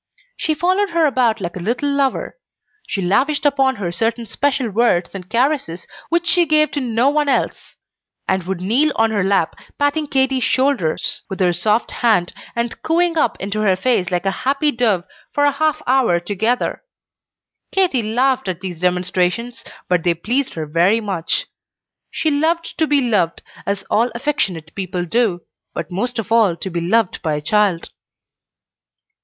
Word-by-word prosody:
She 310 - -1
followed 370 +5 +1
her 335 -2 +2
about 245 -6 +2
like 175 -2 -4
a - - -5
little 240 - -1
lover; 275 -1 0 0.5
she 195 - -2
lavished 275 +12 +1
upon 270 -2 +3
her 190 -6 -3
certain 230 +5 -1
special 270 +2 0
words 215 -4 +1
and 185 -2 -8
caresses 240 - 0 0.2
which 340 +1 +1
she 345 0 +3
gave 305 0 +3
to 290 - -2
no 240 0 +1
one 295 -1 +1
else; - - -1 0.5
and 190 0 +1
would 190 -2 -3
kneel 250 +11 +2
on 225 0 +2
her 205 -3 +1
lap, 195 -4 +1 0.2
patting 290 +1 0
Katy's 265 -2 +1
shoulders 255 - +1
with 190 - -5
her 180 -2 +3
soft 210 +6 0
hand, 215 -8 +1 0.2
and 235 0 -3
cooing 335 +1 +1
up 295 -7 +1
into 200 +2 -3
her 195 -3 +3
face 190 -2 +1
like 180 0 -1
a 195 - +2
happy 280 +3 +1
dove, 225 -8 +1 0.3
for 290 - +2
a 290 - +4
half 310 +2 0
hour 250 -9 +3
together. 205 +7 -1 0.9
Katy 365 -10 +2
laughed 250 +3 +1
at 180 -1 -3
these 180 -4 -6
demonstrations, 180 +6 0 0.2
but 180 -1 +2
they 175 -1 +2
pleased 245 - -1
her 160 -2 -3
very 170 +8 +2
much. 190 -7 -2 0.6
She 315 - -1
loved 325 +4 0
to 315 - +3
be 290 -1 +3
loved, 205 -9 0 0.2
as 200 -1 -1
all 230 +3 +3
affectionate 190 - -2
people 185 -2 -3
do, 195 -2 +1 0.3
but - - -5
most 245 +7 -2
of 225 0 -4
all 220 -7 +4
to 185 +3 -6
be 170 0 -2
loved 205 +3 +1
by 155 -3 -1
a - - -2
child. 195 +1 +1
230 Hz, 170 wpm, -19 LUFS, 185-275 Hz, 0.9 s, a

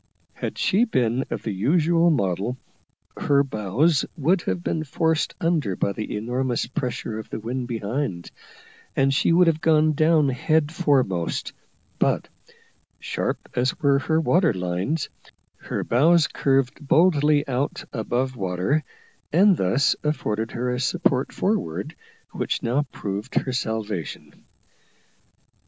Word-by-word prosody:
Had - - -5
she 205 +5 +3
been 125 - 0
of - - -4
the 110 - -2
usual 165 - +3
model, 100 - 0 0.6
her 140 -1 +3
bows 130 - +1
would 170 +5 +2
have 95 - -3
been 160 - -1
forced 160 +2 0
under 160 - 0
by 100 - 0
the 105 0 -4
enormous 125 +3 -1
pressure 120 -3 -4
of 110 - -9
the - - -5
wind 120 +3 -4
behind, 115 -5 -3 0.6
and 135 0 +3
she 140 - +2
would 175 +2 +5
have 160 -2 +1
gone 155 -1 +4
down 155 -1 +3
head 150 +4 +1
foremost; 130 - 0 0.5
but, - - +1 0.7
sharp - - -3
as 125 +2 0
were 140 -1 +3
her 160 +2 +1
water 165 - +3
lines, 90 - -2 0.5
her - - -4
bows 160 +7 +4
curved 135 0 0
boldly 150 -2 +4
out 135 +2 -2
above 125 +2 -1
water, 95 +9 0 0.5
and 190 +4 +5
thus 125 - +2
afforded 110 -7 -1
her 125 +1 -2
a 125 - -2
support 135 -1 +1
forward, 195 - -2 0.4
which - - -2
now 135 +5 0
proved 100 +1 -5
her 130 - 0
salvation. 110 - -4
135 Hz, 130 wpm, -24 LUFS, 110-155 Hz, 0.7 s, would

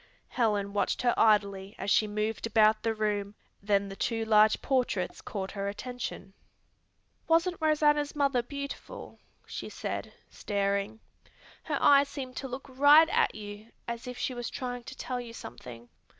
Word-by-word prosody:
Helen 205 -4 0
watched 205 - 0
her 240 - +3
idly 200 -2 +2
as 195 +1 -2
she 215 - +4
moved 215 +2 -2
about 215 -1 +4
the 225 -1 -1
room, 210 -1 -1 0.3
then 200 -1 +1
the 195 - -8
two 225 +2 -1
large 215 0 +5
portraits 245 -9 -1
caught 195 -2 -5
her 200 -1 -4
attention. 205 -2 -6 0.9
"Wasn't 335 +2 +2
Rosanna's 295 -1 +2
mother 275 -4 +2
beautiful?" 280 - -8 0.3
she - - -6
said, - - -5 0.2
staring. 200 +1 -2 0.6
"Her - - -2
eyes 280 0 +5
seem 265 -3 -6
to 270 - -5
look 260 +2 -7
right 290 +5 +6
at 470 +1 +2
you 205 0 -9 0.2
as 235 +1 -5
if 250 0 -6
she 260 - -2
was 240 -1 -4
trying 245 -2 -5
to 260 - -9
tell 250 -1 -3
you 235 -1 -9
something." 120 - -10
225 Hz, 155 wpm, -29 LUFS, 205-265 Hz, 0.9 s, right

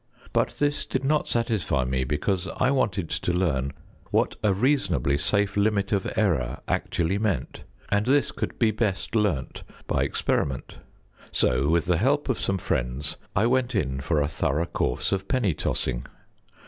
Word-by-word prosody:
But - - +1
this 145 0 0
did 130 - -2
not 150 +2 +2
satisfy 110 - 0
me, 65 0 0
because 90 +7 -1
I 130 +1 +3
wanted 95 -10 0
to - - 0
learn 75 -7 0 0.4
what - - +1
a 105 - +4
reasonably 95 - +2
safe 100 +5 +1
limit 100 -1 +1
of 100 -3 0
error 75 - +1
actually 90 +4 0
meant, 105 -5 -2 0.2
and 105 +2 +1
this 140 +2 +3
could - - -4
be 115 -2 +3
best 105 -1 -1
learnt 100 -12 0 0.2
by - - 0
experiment; 65 -2 -1 0.5
so 65 +3 +2
with 85 -1 +2
the 90 -1 +2
help 140 - +1
of 130 - 0
some 95 - 0
friends 65 -3 -2 0.2
I 95 - +3
went 125 +1 +1
in 65 -2 0
for 75 +3 0
a 70 - +1
thorough 75 +1 0
course 85 - -1
of 95 0 -1
penny 115 -9 +1
tossing. 65 -4 -1
95 Hz, 160 wpm, -26 LUFS, 75-110 Hz, 0.5 s, a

